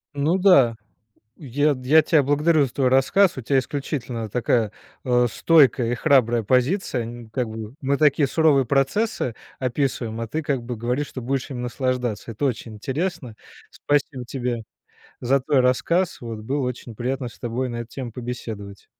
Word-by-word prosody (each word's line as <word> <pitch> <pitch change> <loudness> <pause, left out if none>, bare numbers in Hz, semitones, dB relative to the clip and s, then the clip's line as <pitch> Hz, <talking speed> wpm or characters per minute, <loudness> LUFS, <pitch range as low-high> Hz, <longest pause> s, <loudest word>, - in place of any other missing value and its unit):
Ну 150 +6 +1
да, 160 - +5 0.6
я 145 +1 0
т 130 - -10
я 160 +1 +7
тя 155 -3 +3
благодарю 150 +2 +3
за 125 - -5
твой 135 -2 +1
рассказ. 140 +9 +3
У - - -4
тя 135 +4 +2
исключительно 130 -5 -3
такая, 115 -1 +1 0.3
э, 125 -1 +3
стойкая 130 -3 +4
и - - +1
храбрая 120 -5 +3
позиция. 130 - +1
Н 115 0 -9
как 120 +1 -2
бы 110 +2 -7
мы 140 +1 +1
такие 145 -2 +3
суровые 150 -4 +3
процессы 135 - 0 0.2
описываем, 125 -3 -2
а 115 - -4
ты 160 +5 -3
как 140 -4 -1
бы 120 0 -5
говоришь, 125 +6 -2
что 130 - -7
будешь 130 +3 -2
ими 130 - -5
наслаждаться. 125 -2 -2
Это 115 +6 -4
очень 115 -4 -2
интересно. 130 - -3 0.4
Спасибо 140 -3 -1
тебе 120 -2 -3 0.6
за 130 +2 +2
твой 140 0 +2
рассказ. 165 +8 +1
Вот. 115 -2 -6
Было 135 +7 -2
очень 125 -2 -6
приятно 130 +2 -3
с 120 - -13
тобой 120 +2 -2
на 120 -1 -5
эту 120 - -5
тему 130 -3 -6
побеседовать. 110 -5 -7
130 Hz, 170 wpm, -23 LUFS, 120-145 Hz, 0.6 s, я